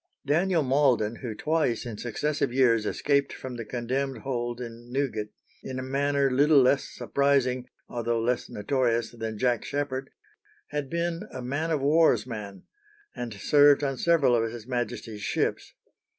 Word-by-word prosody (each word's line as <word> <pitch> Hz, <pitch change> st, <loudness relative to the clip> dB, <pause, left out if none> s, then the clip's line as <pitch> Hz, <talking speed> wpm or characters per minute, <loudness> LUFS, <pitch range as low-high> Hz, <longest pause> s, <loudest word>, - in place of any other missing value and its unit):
Daniel 170 Hz, +2 st, +2 dB
Malden, 130 Hz, -5 st, +2 dB
who 115 Hz, -4 st, -5 dB
twice 150 Hz, -5 st, 0 dB
in 115 Hz, -3 st, -5 dB
successive 140 Hz, +3 st, -1 dB
years 115 Hz, -4 st, +3 dB
escaped 140 Hz, -1 st, +1 dB
from 130 Hz, -1 st, -7 dB
the 115 Hz, -, -5 dB
condemned 130 Hz, +4 st, -3 dB
hold 120 Hz, -3 st, -3 dB
in 120 Hz, 0 st, -9 dB
Newgate, 125 Hz, -6 st, -1 dB, 0.3 s
in 130 Hz, -1 st, -6 dB
a 130 Hz, -, -3 dB
manner 140 Hz, +1 st, +1 dB
little 145 Hz, +3 st, +5 dB
less 135 Hz, +1 st, +3 dB
surprising, 135 Hz, -3 st, 0 dB, 0.2 s
although 120 Hz, -1 st, -1 dB
less 120 Hz, +2 st, -1 dB
notorious, 120 Hz, +1 st, 0 dB
than 110 Hz, -2 st, -5 dB
Jack 120 Hz, +1 st, +1 dB
Sheppard, 135 Hz, -2 st, -3 dB, 0.6 s
had 145 Hz, -2 st, -3 dB
been 170 Hz, +3 st, -2 dB
a 130 Hz, -, -6 dB
man 145 Hz, +6 st, -2 dB
of 155 Hz, -4 st, 0 dB
war's 155 Hz, +4 st, +4 dB
man, 105 Hz, -5 st, -7 dB, 0.5 s
and 120 Hz, -1 st, -5 dB
served 145 Hz, +6 st, +5 dB
on 135 Hz, -1 st, 0 dB
several 150 Hz, -4 st, +3 dB
of 115 Hz, -1 st, 0 dB
his 115 Hz, -2 st, -8 dB
Majesty's 120 Hz, -3 st, -4 dB
ships. -, -, -2 dB
130 Hz, 150 wpm, -27 LUFS, 120-140 Hz, 0.6 s, little